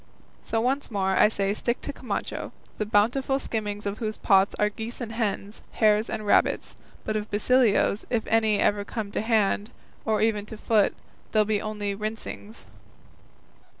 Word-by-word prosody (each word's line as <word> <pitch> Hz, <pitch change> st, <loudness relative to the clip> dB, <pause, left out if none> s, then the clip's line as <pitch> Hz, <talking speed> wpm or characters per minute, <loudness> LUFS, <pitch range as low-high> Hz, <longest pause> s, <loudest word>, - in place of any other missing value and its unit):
So 225 Hz, -, -1 dB
once 270 Hz, +4 st, 0 dB
more 195 Hz, -3 st, 0 dB
I 190 Hz, -, +5 dB
say 200 Hz, -2 st, 0 dB
I -, -, +1 dB
stick 240 Hz, +3 st, -1 dB
to 285 Hz, -, -5 dB
Camacho, 255 Hz, -, -4 dB, 0.3 s
the 215 Hz, -, -1 dB
bountiful 245 Hz, +6 st, +2 dB
skimmings 210 Hz, -5 st, -4 dB
of 200 Hz, +1 st, -3 dB
whose 215 Hz, -2 st, -3 dB
pots 195 Hz, 0 st, +3 dB
are 210 Hz, -, +2 dB
geese 225 Hz, +3 st, -7 dB
and 235 Hz, -3 st, -5 dB
hens, 215 Hz, -2 st, -3 dB
hares 215 Hz, 0 st, +3 dB
and 215 Hz, -, -4 dB
rabbits; 205 Hz, -, +2 dB, 0.3 s
but 215 Hz, -, -1 dB
of 210 Hz, 0 st, -2 dB
Basilio's, 215 Hz, -1 st, +3 dB
if 230 Hz, -3 st, 0 dB
any 220 Hz, -2 st, +3 dB
ever 205 Hz, 0 st, +2 dB
come 205 Hz, -1 st, -5 dB
to -, -, -1 dB
hand, 215 Hz, -2 st, +1 dB, 0.3 s
or 220 Hz, -1 st, +1 dB
even 210 Hz, -2 st, +1 dB
to 220 Hz, -, -8 dB
foot, 215 Hz, -1 st, +2 dB, 0.4 s
they'll 215 Hz, -1 st, +4 dB
be 210 Hz, -1 st, 0 dB
only 210 Hz, -1 st, -3 dB
rinsings." 215 Hz, +1 st, -6 dB
215 Hz, 170 wpm, -26 LUFS, 205-225 Hz, 0.4 s, I